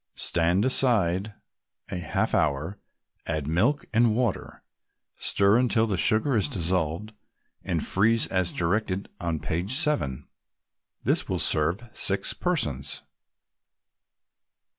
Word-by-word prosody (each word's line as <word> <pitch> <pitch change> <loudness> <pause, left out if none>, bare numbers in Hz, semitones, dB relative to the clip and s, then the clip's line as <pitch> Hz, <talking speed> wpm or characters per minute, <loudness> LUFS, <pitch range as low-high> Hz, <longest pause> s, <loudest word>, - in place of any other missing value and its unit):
Stand 85 +5 +2
aside 105 -6 +3 0.6
a 90 - -3
half 85 - -2
hour, 75 +7 -1 0.5
add 75 -2 -2
milk 105 - 0
and 115 -1 +3
water, 120 -4 -3 0.6
stir 100 +2 +3
until 120 -3 +2
the 105 -4 -2
sugar 110 +8 +2
is 105 - +2
dissolved, 90 +3 -2 0.5
and - - -2
freeze 115 +4 +2
as 95 -2 0
directed 95 +2 -2
on 85 -2 -2
page 85 - -3
7. 140 - 0 0.8
This - - 0
will - - -1
serve 85 +10 0
six 100 0 +1
persons. 70 - -2
95 Hz, 110 wpm, -25 LUFS, 85-115 Hz, 0.8 s, aside